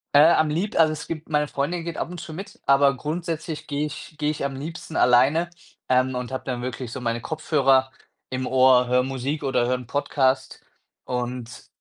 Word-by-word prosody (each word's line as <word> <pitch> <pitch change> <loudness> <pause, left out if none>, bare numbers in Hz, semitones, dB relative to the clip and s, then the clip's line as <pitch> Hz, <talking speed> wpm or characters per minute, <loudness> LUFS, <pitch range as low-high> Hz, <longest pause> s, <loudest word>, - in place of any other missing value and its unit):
Äh, 155 +4 +8
am 155 -2 +3
lieb 185 +7 -1
also, 155 -1 +5
es 155 - -7
gibt 160 -2 -6
meine 150 -1 0
Freundin 165 +5 -2
geht 170 0 -5
ab - - -3
und 175 -3 -7
zu 160 - -8
mit, 195 +5 -9
aber 140 -1 +5
grundsätzlich 160 +1 -4
gehe 145 +1 -1
ich 150 +1 -8
gehe 150 -1 0
ich 145 - -4
am 140 - -3
liebsten 160 +3 -7
alleine, 135 +8 +4 0.4
ähm, 130 0 +2
und 125 0 -4
habe 130 - -4
dann 125 -2 -3
wirklich 125 0 -5
so 130 - -5
meine 115 -1 -1
Kopfhörer 135 -2 +2 0.4
im 130 0 -3
Ohr, 130 -1 +5
höre 125 +1 +3
Musik 135 +3 -3
oder 125 -3 +1
höre 130 - +1
'n 125 - -10
Podcast 135 -1 0 0.4
und 125 -1 -5
140 Hz, 200 wpm, -24 LUFS, 130-155 Hz, 0.4 s, Äh